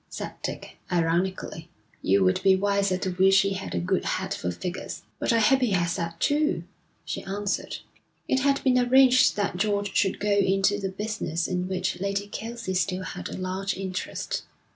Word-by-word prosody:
said - - -6
Dick, - - -6
ironically. 170 0 -1 0.3
'You 95 0 +3
would 95 0 +2
be 190 0 +5
wiser 200 -1 +1
to 185 0 -2
wish 190 +2 +5
he 195 0 0
had 190 - -5
a - - +1
good 85 - 0
head - - -2
for 90 - -3
figures.' 175 - -5 0.2
'But - - +1
I 230 - +4
hope 245 +4 +4
he 240 -5 +2
has 175 -1 +1
that, 170 -2 -4
too,' 300 +3 +1 0.4
she - - -4
answered. 200 +1 -3 0.5
It 265 - +2
had 275 +1 +1
been 255 -1 +4
arranged 255 +1 +5
that 200 -3 -1
George 205 0 0
should 195 -2 +2
go 210 0 0
into 195 +1 +2
the 195 -1 -2
business 190 -5 -3
in 180 0 -2
which 185 -1 -2
Lady 200 +1 -1
Kelsey 230 -1 -5
still 185 0 0
had - - -6
a - - -6
large 190 +1 -2
interest. 190 -1 -3
195 Hz, 185 wpm, -26 LUFS, 185-205 Hz, 0.5 s, be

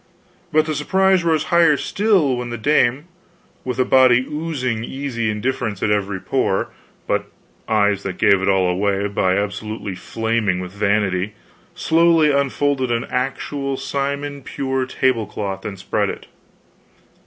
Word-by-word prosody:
But 155 0 +3
the 155 - -2
surprise 190 +5 +2
rose 160 -2 +2
higher 165 -4 +5
still 195 -11 +1
when 125 0 -4
the 120 - -4
dame, 135 +2 +2 0.6
with 125 -1 -4
a 130 - +2
body 130 -1 +5
oozing 140 -7 -3
easy 120 -4 -3
indifference 110 -1 -2
at 105 - +2
every 100 -2 -1
pore, - - 0 0.4
but - - -1 0.4
eyes 105 -2 +2
that 95 -2 -5
gave 100 -1 +4
it 95 - +1
all 95 -1 +3
away 100 +2 0
by 95 -2 +1
absolutely 105 0 -4
flaming 110 -1 -1
with 90 0 -6
vanity, 100 -1 0 0.4
slowly 165 -2 +3
unfolded 140 -1 0
an 120 0 0
actual 135 +1 -2
simon 140 +1 -3
pure 130 -1 -2
tablecloth 105 -7 -1
and 100 -2 -5
spread 95 - -1
it. - - -7
125 Hz, 140 wpm, -20 LUFS, 100-140 Hz, 0.6 s, higher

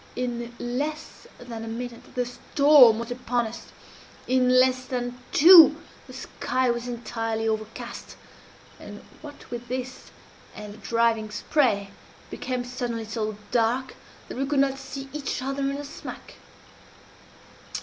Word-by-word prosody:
In 240 -1 -3
less 290 +6 -4
than 235 -2 -8
a - - -7
minute 235 +1 -7
the 250 -1 0
storm 255 -1 +5
was 235 +1 -5
upon 245 -1 -1
us 220 +1 -8 0.6
in 255 0 +3
less 255 0 +3
than 245 -1 -4
two 325 -1 +9 0.3
the 255 - -12
sky 255 -1 -1
was 240 +1 -4
entirely 225 -2 -3
overcast 220 +2 -5 0.6
and - - -10 0.2
what 290 -4 -12
with 240 0 -6
this 255 +1 -6 0.5
and 210 -1 -8
the - - -14
driving 230 0 +1
spray, 210 -2 0
it - - -24
became 250 -1 -3
suddenly 245 -2 -4
so 215 -1 -4
dark 245 +3 0 0.3
that - - -7
we 270 - 0
could 290 0 -1
not 270 0 +1
see 270 0 -7
each 295 -2 -3
other 270 +2 -3
in 275 0 -1
the 290 - -5
smack. 285 - -9
245 Hz, 140 wpm, -25 LUFS, 230-265 Hz, 0.6 s, two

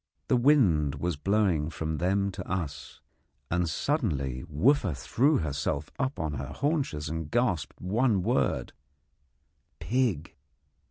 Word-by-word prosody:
The - - +4
wind 105 - +4
was 85 +4 -2
blowing 90 -2 +1
from 80 -1 -3
them 100 +3 +1
to 90 -2 -7
us, 80 -7 -4 0.5
and 90 -1 +1
suddenly 75 - -1
Wooffa 100 - +2
threw 135 - +2
herself 75 -1 -2
up 135 0 -1
on 80 -3 -2
her 65 -1 -4
haunches 140 - -1
and 80 -1 -4
gasped 105 - 0
one 105 +1 +1
word 110 - 0 1.1
'Pig!' 115 - 0
90 Hz, 120 wpm, -28 LUFS, 75-120 Hz, 1.1 s, The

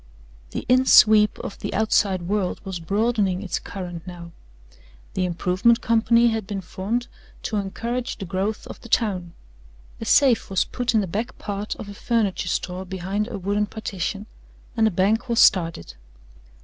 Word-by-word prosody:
XVI - - -27
The - - -4
in 255 +1 +4
sweep 215 -1 +6
of 200 - -7
the - - -4
outside 200 -3 +2
world 190 0 -1
was 190 -2 -4
broadening 200 +1 0
its 190 - -2
current 175 -3 -7
now. 170 -1 -9 0.8
The 185 - 0
improvement 180 +6 +2
company 230 +1 +4
had 220 -3 -3
been 200 -2 -4
formed 205 +7 -3 0.4
to 215 - -2
encourage 235 +6 -3
the 195 - -6
growth 195 +4 -2
of - - -10
the 235 - -12
town. 185 -7 0 0.7
A 225 - -5
safe 255 -1 +4
was 190 -2 +1
put 245 -1 -2
in 215 - +4
the - - -1
back 220 +8 -4
part 205 0 -4
of - - -9
a 205 - -8
furniture 210 -4 -1
store 180 +1 -2
behind 190 +3 -3
a 235 -4 -5
wooden 205 +2 0
partition 200 -1 -4 0.5
and 225 -1 +3
a - - +3
bank 210 +6 +1
was 235 - +2
started. 165 - +3
205 Hz, 170 wpm, -23 LUFS, 185-225 Hz, 0.8 s, sweep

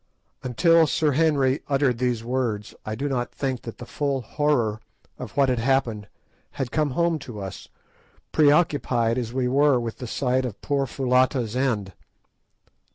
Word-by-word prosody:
_" - - -46 0.4
Until 165 +6 +4
Sir 155 0 +1
Henry 140 -2 +2
uttered 135 -4 +1
these 125 -3 0
words 115 -4 -2
I 110 - -2
do 140 +6 -2
not 125 -3 -2
think 130 -3 -3
that 115 - -8
the 120 - -8
full 140 +1 -2
horror 120 -4 0 0.4
of 110 - -8
what 140 -1 +4
had 125 -2 +1
happened 115 -5 0 0.5
had 125 -2 -4
come 155 -2 +1
home 170 -2 +2
to 120 -6 -9
us, 95 -1 -7 0.6
preoccupied 145 -6 +3
as 115 -2 -4
we 125 0 0
were 140 0 +3
with 115 -2 -5
the 125 - -5
sight 130 +2 0
of 120 -5 -5
poor 140 -2 -1
Foulata's 125 -2 +1
end. 115 -8 -1
130 Hz, 160 wpm, -24 LUFS, 115-145 Hz, 0.6 s, Until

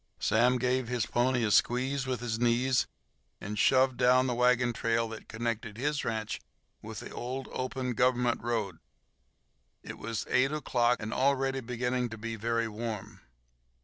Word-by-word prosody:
Sam 120 +4 +3
gave 125 0 0
his 120 -2 0
pony 120 0 +1
a 105 - +1
squeeze 130 +5 +2
with 125 -2 -2
his 115 -2 -2
knees 120 +1 +2 0.5
and 105 +1 -5
"shoved" 130 +1 +4
down 130 +1 +4
the 125 - 0
wagon 125 0 +3
trail 115 0 0
that 110 -1 -9
connected 115 -1 -3
his 145 +3 -1
ranch 110 -1 -3 0.4
with - - -7
the - - -9
old, 130 +2 -5
open 130 0 -3
Government 125 0 +2
road. 110 -7 -2 1.0
It - - -8
was 110 0 -3
eight 130 +2 +3
o'clock, 125 -6 +1
and 110 +2 -3
already 135 0 +1
beginning 125 0 -2
to 115 - -7
be 115 +1 -4
very 115 +1 0
warm. 110 -1 -6
120 Hz, 155 wpm, -30 LUFS, 115-130 Hz, 1.0 s, shoved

